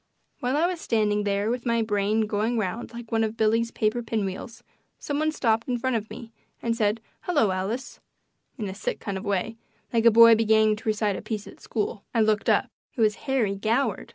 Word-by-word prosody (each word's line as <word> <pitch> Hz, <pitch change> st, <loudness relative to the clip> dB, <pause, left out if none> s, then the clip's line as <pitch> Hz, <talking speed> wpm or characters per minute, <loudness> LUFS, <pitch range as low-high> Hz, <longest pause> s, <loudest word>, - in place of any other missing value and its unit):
While 255 Hz, +3 st, 0 dB
I 320 Hz, -, +3 dB
was 350 Hz, -2 st, -2 dB
standing 210 Hz, -2 st, +1 dB
there 200 Hz, +2 st, 0 dB
with 245 Hz, 0 st, -3 dB
my 235 Hz, -2 st, +1 dB
brain 210 Hz, 0 st, +1 dB
going 215 Hz, +2 st, 0 dB
round 220 Hz, +3 st, -3 dB
like 235 Hz, -1 st, -9 dB
one 225 Hz, -1 st, +2 dB
of 220 Hz, +1 st, -3 dB
Billy's 225 Hz, +1 st, +2 dB
paper 220 Hz, +1 st, 0 dB
pinwheels 220 Hz, 0 st, -4 dB, 0.3 s
some 290 Hz, 0 st, -3 dB
one 310 Hz, 0 st, +1 dB
stopped 230 Hz, -6 st, 0 dB
in 250 Hz, -1 st, 0 dB
front 260 Hz, +1 st, -1 dB
of 215 Hz, -1 st, -3 dB
me 230 Hz, +1 st, -9 dB, 0.3 s
and 230 Hz, -1 st, -1 dB
said, 215 Hz, -1 st, 0 dB, 0.2 s
"Hello, 290 Hz, -, +2 dB
Alice," 195 Hz, +8 st, -4 dB, 0.6 s
in 215 Hz, -5 st, -3 dB
a 190 Hz, -, -5 dB
sick 200 Hz, -, -4 dB
kind 200 Hz, -, -4 dB
of 190 Hz, -, -9 dB
a -, -, -6 dB
way, 205 Hz, +3 st, -1 dB, 0.4 s
like 230 Hz, -1 st, +2 dB
a -, -, +11 dB
boy 230 Hz, +1 st, +8 dB
beginning 220 Hz, -1 st, +4 dB
to 220 Hz, 0 st, -4 dB
recite 210 Hz, -2 st, 0 dB
a -, -, -6 dB
piece 215 Hz, -1 st, -4 dB
at -, -, -13 dB
school. 210 Hz, -1 st, -3 dB
I 230 Hz, -, +4 dB
looked 215 Hz, -1 st, +2 dB
up. -, -, +2 dB, 0.2 s
It 245 Hz, -, -2 dB
was 215 Hz, -1 st, +4 dB, 0.2 s
Harry 235 Hz, -7 st, +2 dB
Goward! 225 Hz, +2 st, -1 dB
220 Hz, 215 wpm, -25 LUFS, 210-235 Hz, 0.6 s, a